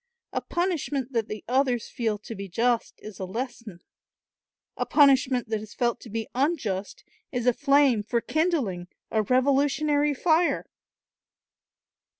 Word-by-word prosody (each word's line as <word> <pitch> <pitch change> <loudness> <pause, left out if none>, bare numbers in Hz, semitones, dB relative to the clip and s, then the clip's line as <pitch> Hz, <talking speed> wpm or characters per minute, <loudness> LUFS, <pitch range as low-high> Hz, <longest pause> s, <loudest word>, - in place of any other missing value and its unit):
A - - -1
punishment 295 -7 -2
that 225 -2 0
the 215 0 -7
others 250 -2 +1
feel 225 -3 -2
to 215 +2 -9
be 200 -2 -7
just 235 +5 0
is 215 -2 -9
a - - -3
lesson; 230 -3 -6 0.9
a - - -1
punishment 265 -4 +4
that 220 -1 -1
is 215 -1 -11
felt 240 -1 0
to 235 - -12
be 225 +1 -3
unjust 245 - -1 0.3
is 245 -2 -2
a 250 - +4
flame 275 -4 +3
for 235 +3 0
kindling 265 - -1 0.2
a 220 - +2
revolutionary 285 +4 +2
fire. 335 +4 +2
245 Hz, 140 wpm, -26 LUFS, 220-280 Hz, 0.9 s, punishment